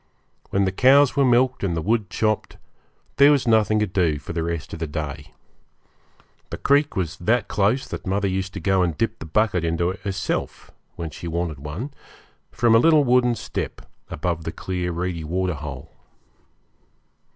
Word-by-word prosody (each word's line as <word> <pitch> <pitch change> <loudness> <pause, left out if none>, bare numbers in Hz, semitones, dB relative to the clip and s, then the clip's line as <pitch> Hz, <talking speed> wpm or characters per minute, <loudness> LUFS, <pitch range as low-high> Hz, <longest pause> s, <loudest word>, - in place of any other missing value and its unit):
When 100 0 +1
the 95 - 0
cows 135 +6 +5
were 140 - +3
milked 125 -1 +2
and 85 -4 0
the - - +1
wood 110 -1 0
chopped, 110 -1 -1 0.6
there 140 +1 +7
was 140 -4 +2
nothing 110 -1 +3
to 105 - +2
do 90 -6 +1
for 70 +3 -8
the 85 - -1
rest 85 -3 -4
of - - -6
the 80 - -3
day. 75 -1 -6 1.2
The - - -5
creek 145 -1 +2
was 90 -4 -2
that 110 +6 +1
close 105 +6 +1
that - - -7
mother 100 +1 0
used 95 0 -2
to - - -3
go 95 -1 +2
and 85 -4 0
dip 115 0 -1
the 80 - -8
bucket 90 0 +1
into 85 +2 0
it 95 - -9
herself, 95 -2 -4 0.2
when 80 -2 -5
she 85 - -8
wanted 85 -3 -3
one, 85 - -6 0.6
from 120 -1 +2
a 115 - +7
little 155 +2 +5
wooden 125 -1 +3
step - - -5 0.3
above 85 0 -3
the 80 - -4
clear 90 +1 -3
reedy 85 -1 -3
waterhole. 75 -4 -4
95 Hz, 175 wpm, -23 LUFS, 85-115 Hz, 1.2 s, there